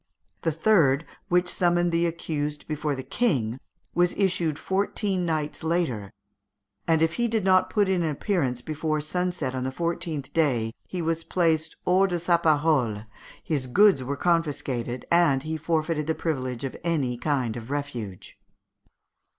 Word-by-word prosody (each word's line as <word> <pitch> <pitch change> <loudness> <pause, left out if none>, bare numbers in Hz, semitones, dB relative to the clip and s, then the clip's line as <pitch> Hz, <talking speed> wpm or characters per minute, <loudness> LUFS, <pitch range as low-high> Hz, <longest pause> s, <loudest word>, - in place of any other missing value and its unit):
The 165 - +1
third, 160 -4 +3 0.2
which 180 0 +3
summoned 175 -1 +2
the 170 +1 +2
accused 150 -3 -3
before 150 -1 -2
the 130 - -6
King, 130 - 0 0.3
was 175 0 +2
issued 175 -6 +1
fourteen 190 -1 -1
nights 155 -2 -2
later, 160 - -1 0.8
and 160 -1 +3
if 160 0 +2
he 235 - +2
had 220 -3 +1
not 185 -1 +4
put 205 -3 +2
in 190 -2 +1
an 165 - 0
appearance 140 - -1
before 155 +1 -1
sunset 175 -3 -2
on 130 -1 -2
the 130 - -2
fourteenth 170 -2 -3
day, 120 -9 +1
he 180 -2 -4
was 165 0 -1
placed 160 -3 +1
hors 190 +2 +4
de 175 -2 -1
sa 170 0 +3
parole, 145 -9 +2 0.4
his 140 -5 -2
goods 190 0 +5
were 140 +2 -3
confiscated, 140 -8 -1
and 165 -6 +4
he 160 0 -3
forfeited 160 -1 -1
the 160 - +1
privilege 130 -6 -3
of 135 - -4
any 145 -8 0
kind 125 -3 -1
of 120 0 -7
refuge. 120 -10 -5
160 Hz, 155 wpm, -26 LUFS, 135-175 Hz, 0.8 s, goods